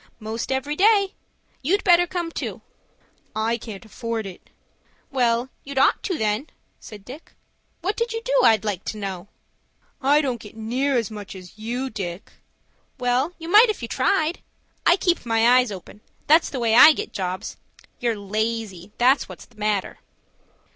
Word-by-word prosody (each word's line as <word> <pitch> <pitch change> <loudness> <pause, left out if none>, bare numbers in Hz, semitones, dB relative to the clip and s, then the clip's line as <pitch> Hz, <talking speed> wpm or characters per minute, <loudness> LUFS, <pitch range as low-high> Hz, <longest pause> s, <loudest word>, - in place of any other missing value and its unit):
"Most 220 +3 -4
every 265 +3 -1
day. 400 +1 +4 0.5
You'd 380 +10 +1
better 350 -1 +5
come 345 -2 -3
too." - - -5 0.7
"I 225 +2 0
can't 215 -2 -9
afford 225 0 -4
it." 190 -2 -11 0.6
"Well, 245 -1 +1
you'd 280 -1 -8
ought 265 - +4
to, 375 -7 -2
then," 215 +5 -1 0.3
said 205 -3 -12
Dick. 280 +6 -11 0.5
"What 385 +5 -2
do 465 - 0
you 455 - -2
do - - -1
I'd 220 -1 +4
like 195 -3 -2
to 215 - -4
know?" 195 -2 -5 0.7
"I 285 +3 +4
don't 255 -6 -2
get 210 +1 -12
near 255 +5 0
as 230 -3 -1
much 205 -2 -8
as 185 -1 -12
you, 245 +4 -3
Dick." 185 -3 -6 0.7
"Well 255 +6 0
you 330 - -9
might 425 +6 +7
if 415 - -3
you - - -3
tried. 315 +7 0 0.5
I 345 - +6
keep 350 -3 +1
my 235 +2 +4
eyes 250 -4 0
open,—that's 210 - 0
the 265 - -4
way 230 -2 +1
I 305 +7 +9
get - - -6
jobs. 185 -2 -4 0.4
You're 235 -4 0
lazy, 210 -2 -3
that's 260 +3 +3
what's - - -10
the 235 - -26
matter." 210 -2 -1
240 Hz, 165 wpm, -23 LUFS, 215-300 Hz, 0.7 s, I